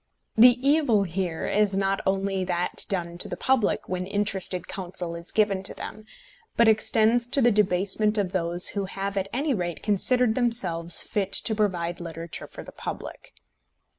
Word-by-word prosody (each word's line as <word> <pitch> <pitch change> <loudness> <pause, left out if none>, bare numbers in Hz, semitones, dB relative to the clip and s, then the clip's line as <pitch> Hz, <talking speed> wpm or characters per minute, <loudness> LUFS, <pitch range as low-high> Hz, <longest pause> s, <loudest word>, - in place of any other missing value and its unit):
The 245 +2 +7
evil 280 -9 +3
here 175 -2 -3
is 205 -1 +1
not 195 0 0
only 195 0 0
that 180 -1 -2
done 175 -3 -2
to - - -1
the - - -6
public 260 -6 0
when 185 0 -4
interested 195 -2 -1
counsel 180 -2 -6
is 170 +1 -9
given 205 -3 +1
to 190 - -1
them, 215 0 -9 0.5
but 235 - +5
extends 225 +2 +3
to 275 - 0
the 240 -2 +4
debasement 205 +1 +1
of 195 -3 -1
those 175 -1 +1
who 200 -1 -3
have 195 +1 -5
at 195 -1 -1
any 280 +3 -1
rate 175 -6 -4
considered 225 +3 +3
themselves 185 -9 +2
fit 200 -2 -3
to 220 - +1
provide 180 -5 -2
literature 165 -1 -7
for - - -11
the - - -12
public. - - -8
195 Hz, 165 wpm, -25 LUFS, 180-220 Hz, 0.5 s, The